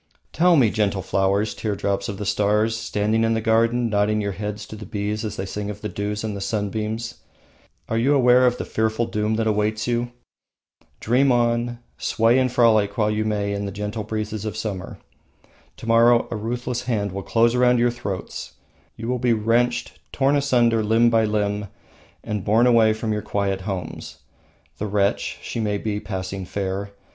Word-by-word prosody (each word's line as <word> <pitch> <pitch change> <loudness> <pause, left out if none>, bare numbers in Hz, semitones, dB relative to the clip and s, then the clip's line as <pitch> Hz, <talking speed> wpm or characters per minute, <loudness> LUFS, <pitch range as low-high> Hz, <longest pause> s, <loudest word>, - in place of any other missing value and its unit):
Tell 175 +1 +4
me, 120 -8 +4
gentle 100 -3 0
flowers, 100 +2 +1
teardrops 100 0 -2
of 100 - -5
the 105 - -5
stars, 105 +2 +1
standing 110 0 0
in 115 0 +2
the - - +1
garden, 115 +2 +2
nodding 105 0 +1
your 100 -1 -1
heads 105 +1 -5
to - - -9
the 105 -2 -9
bees 105 +1 -3
as 110 - -4
they 95 - -4
sing 105 +1 -4
of 105 0 -7
the 105 - -4
dews 105 +2 -3
and 110 -2 -3
the 100 - -6
sunbeams, 110 +3 -3 0.7
are 115 - 0
you 140 +5 +3
aware 125 -1 +5
of 125 0 +1
the - - -4
fearful 110 +1 0
doom 105 0 -1
that 115 0 0
awaits 110 0 0
you? 120 0 -1 0.9
Dream 130 +4 +3
on, 120 0 +1 0.2
sway 115 +2 +3
and 130 -1 +1
frolic 110 -4 +3
while 105 -1 +2
you 105 0 0
may 100 -1 -1
in 100 0 -3
the - - -4
gentle 105 +2 -4
breezes 110 0 -4
of 110 -1 -4
summer. 100 -5 -5 0.8
To - - -10
morrow 115 +1 +4
a - - -2
ruthless 120 +3 -3
hand 105 -5 -1
will 100 +2 -4
close 115 +3 +2
around 125 0 +4
your 120 0 +3
throats. 105 -6 -6 0.4
You 115 - -6
will 125 0 -1
be 120 -1 +2
wrenched, 120 +2 0
torn 140 +1 +2
asunder 120 -5 +3
limb 115 +2 +3
by 115 -1 +3
limb, 105 -1 -1 0.6
and 105 -4 -3
borne 110 +5 +3
away 115 -3 +5
from 110 0 -2
your 105 - -2
quiet 100 -2 -1
homes. 95 -2 -6 0.6
The 105 - -2
wretch, 100 0 0
she - - -4
may 105 -2 0
be 105 0 -3
passing 95 -2 -5
fair. 100 0 -3
110 Hz, 185 wpm, -23 LUFS, 105-115 Hz, 0.9 s, aware